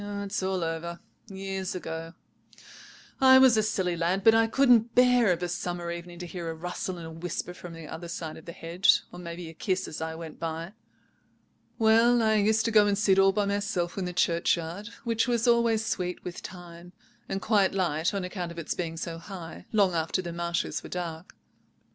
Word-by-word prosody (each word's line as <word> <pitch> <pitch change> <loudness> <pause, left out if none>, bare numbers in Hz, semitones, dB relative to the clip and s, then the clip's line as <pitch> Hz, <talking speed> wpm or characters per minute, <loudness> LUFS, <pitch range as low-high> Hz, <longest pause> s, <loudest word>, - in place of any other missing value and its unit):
It's 200 0 -3
all 190 -1 -1
over, 165 +1 -4 0.3
years 195 -2 -4
ago. 165 -1 -6 1.0
I 260 0 +8
was 260 -3 +7
a 215 - +4
silly 190 -5 0
lad; 175 +3 0
but 225 - +7
I 225 0 +4
couldn't 240 -2 +4
bear 250 -4 +5
of 175 0 -1
a - - 0
summer 175 0 -3
evening 170 0 -7
to 175 - -6
hear 170 -1 -5
a 165 - -4
rustle 180 +2 -4
and 170 - -8
a 160 - -8
whisper 175 +2 -5
from 180 -1 -10
the 165 -1 -9
other 170 +3 -7
side 165 -2 -5
of 160 - -13
the 170 - -7
hedge, 170 +4 +2
or 175 - -10
maybe 170 0 -7
a 160 - -9
kiss 185 +3 -1
as 155 - -7
I 160 0 -3
went 160 -1 -9
by. 165 +3 -4 1.0
"Well, 230 +1 +5
I 220 -1 +3
used 220 +2 +2
to 230 - +1
go 210 -1 +6
and 200 -1 +1
sit 195 -2 +3
all 195 0 +6
by 205 +1 0
myself 200 -4 -1
in 195 - -2
the 180 - -3
churchyard, 170 +2 0 0.2
which 230 0 +1
was 240 0 +1
always 235 -2 +3
sweet 180 -5 -3
with 175 - -6
thyme, 175 -1 -11 0.4
and 195 - -1
quite 200 -3 +2
light 170 -4 +1
(on 200 -2 -3
account 180 -1 -4
of 170 - -11
its 165 - -3
being 165 -2 -4
so 165 0 -5
high) 170 -2 -9
long 200 -4 +3
after 165 +2 0
the 170 -1 -5
marshes 170 0 -2
were - - -10
dark. 170 -1 -6
180 Hz, 205 wpm, -28 LUFS, 170-210 Hz, 1.0 s, I